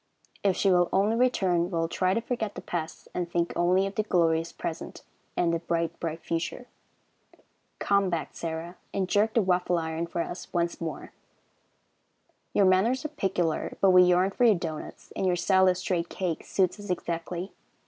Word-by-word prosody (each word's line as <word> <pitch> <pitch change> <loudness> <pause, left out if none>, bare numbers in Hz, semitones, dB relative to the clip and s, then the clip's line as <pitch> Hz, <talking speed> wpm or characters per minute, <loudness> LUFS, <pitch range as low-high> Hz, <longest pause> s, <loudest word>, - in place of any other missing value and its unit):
If 195 -2 +2
she 195 - +3
will 175 -1 +4
only 205 +4 +2
return, 190 -8 +2
we - - -6
will 165 -2 0
try 185 +2 +1
to 230 - +1
forget 225 -3 -3
the - - -6
past, 165 -2 -5
and 175 -1 -2
think 170 0 0
only 180 +2 +3
of 195 - -4
the 215 - +1
glorious 165 -5 +1
present 165 - -6 0.3
and 170 -1 +2
the 165 - 0
bright, 170 0 -2
bright 165 -1 -4
future. 170 +9 -3 1.1
Come 200 -1 +2
back, 170 -2 -2
Sarah, 165 +1 -5 0.2
and 190 -2 0
jerk 215 +3 +2
the 230 - +4
waffle 180 -1 +1
iron 160 0 -2
for 170 0 -2
us 175 +2 -6
once 170 -1 -1
more. 160 -4 -5 1.4
Your 200 - +3
manners 220 +9 +3
are - - -1
peculiar, 190 - -1
but 195 - +5
we 180 0 +8
yearn 180 +2 +4
for 245 - -1
your 225 -4 +6
doughnuts, 165 -3 -6
and 190 - 0
your 180 - +3
style 190 +2 +3
of 180 -1 +3
streaked 180 -2 -1
cake 180 -4 -3
suits 190 +1 +1
us 205 -1 -9
exactly. 175 +1 -3
180 Hz, 185 wpm, -27 LUFS, 170-195 Hz, 1.4 s, we